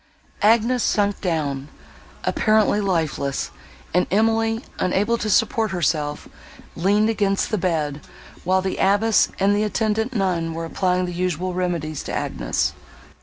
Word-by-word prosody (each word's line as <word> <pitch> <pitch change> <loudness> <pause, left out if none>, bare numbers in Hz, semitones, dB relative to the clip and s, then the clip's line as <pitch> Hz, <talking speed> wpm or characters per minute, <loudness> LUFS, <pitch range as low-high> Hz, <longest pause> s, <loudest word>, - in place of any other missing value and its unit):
Agnes 230 +3 +3
sunk 205 -1 +1
down, 145 -6 -2 0.6
apparently 215 -1 +2
lifeless, 160 -7 -1 0.4
and 180 +1 +2
Emily, 225 +3 +1 0.2
unable 205 +5 +1
to 220 -2 -3
support 220 +2 +2
herself, 155 -5 -1 0.5
leaned 205 +5 +2
against 200 -3 0
the 215 - +1
bed, 155 -5 -1 0.4
while 185 +1 +2
the 190 - -2
abbess 205 +3 +3
and 200 +1 +3
the 205 - +1
attendant 220 +2 0
nun 170 -5 0
were 165 0 -3
applying 180 +2 0
the 180 - -5
usual 180 0 -2
remedies 170 -4 -2
to - - -6
Agnes. - - -1
190 Hz, 130 wpm, -22 LUFS, 165-215 Hz, 0.6 s, Agnes